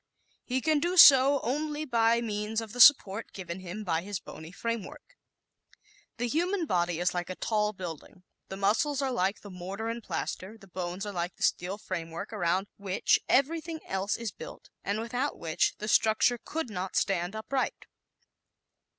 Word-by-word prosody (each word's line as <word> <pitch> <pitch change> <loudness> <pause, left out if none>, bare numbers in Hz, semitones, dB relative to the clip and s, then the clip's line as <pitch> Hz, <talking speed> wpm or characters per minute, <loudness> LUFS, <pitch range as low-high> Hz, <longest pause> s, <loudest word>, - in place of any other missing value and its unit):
He 260 +1 -1
can 305 0 +2 0.2
so 275 -3 +9
do - - -6
only 300 +3 -2
by 235 -3 +3
means 215 -1 -2
of 225 -1 -7
the 245 - -7
support 225 -7 +6
given 180 -2 -6
him 190 +4 -7
by 165 -4 0
his 200 0 -4
bony 160 +1 -11
framework. 230 - -5 1.0
The 245 - -1
human 350 - 0
body 175 - 0
is 175 0 +1
like 175 0 -3
a 185 - -4
tall 210 0 0
building 180 -1 -9 0.3
the 190 - -6
muscles 250 +9 +1
are 265 - 0
like 195 -3 0
the 205 - -10
mortar 190 +5 -5
and 230 +1 -4
plaster, 210 0 -5
the 200 - -16
bones 180 +1 -5
are 205 - -5
like 175 0 -3
the - - -7
steel 185 +3 0
framework 170 +1 -6
around 185 -1 0
which 195 -2 +1
everything 320 +4 +1
else 190 +2 -1
is 230 -3 -4
built - - -11
and 205 +2 -1
without 245 +5 -2
which 160 -1 0
the 215 - -5
structure 220 +3 +3
could 320 -7 -4
not 185 -1 -4
stand 185 0 0
upright. 255 +5 -2
210 Hz, 170 wpm, -29 LUFS, 185-250 Hz, 1.0 s, so